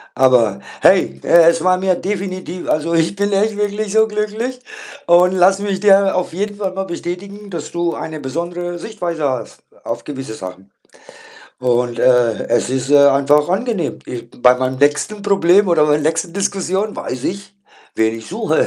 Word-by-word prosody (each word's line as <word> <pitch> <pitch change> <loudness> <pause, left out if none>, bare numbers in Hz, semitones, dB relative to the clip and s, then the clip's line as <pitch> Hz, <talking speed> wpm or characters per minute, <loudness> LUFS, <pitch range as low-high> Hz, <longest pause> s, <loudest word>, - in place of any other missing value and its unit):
aber, 120 -6 +3 0.2
hey, 70 - +3
äh, 170 -1 +6
es 165 0 0
war 185 0 +3
mir 185 -1 +1
definitiv 185 -2 -5
also, 160 +2 0
ich 165 +3 +1
bin 200 +1 -1
echt 205 +2 +1
wirklich 205 0 -2
so 220 0 +4
glücklich, 215 +4 -3 0.5
und 175 +1 +5
lass 190 +1 +4
mich 200 -2 -2
dir 195 -1 +4
auf 180 -2 -2
jeden 205 +3 -4
Fall 195 -2 -3
mal 195 +1 -3
bestätigen, 195 +4 -7
dass 170 -5 -6
du 170 0 -1
eine 155 -1 -6
besondere 175 +5 -5
Sichtweise 175 -6 -5
hast 130 -2 -5 0.2
auf - - -5
gewisse 135 -5 -7
Sachen 95 -1 -10 0.9
und, 125 -1 0
äh, 120 -3 +2
es 120 +1 +1
ist, 130 +1 -2
äh, 145 - +6
einfach 140 +2 +3
angenehm. 195 -3 -2
Ich 120 -1 -7
bei 125 0 +6
meinem 130 0 -2
nächsten 150 +9 +1
Problem 200 -1 +3
oder 155 -3 +3
bei 150 - +2
der 150 - -4
nächsten 165 +1 -4
Diskussion 195 +1 -2
weiß 125 0 -6
ich, 200 +1 -5 0.4
wen 110 0 0
ich 115 - -12
suche. 210 -4 0
175 Hz, 175 wpm, -17 LUFS, 140-200 Hz, 0.9 s, äh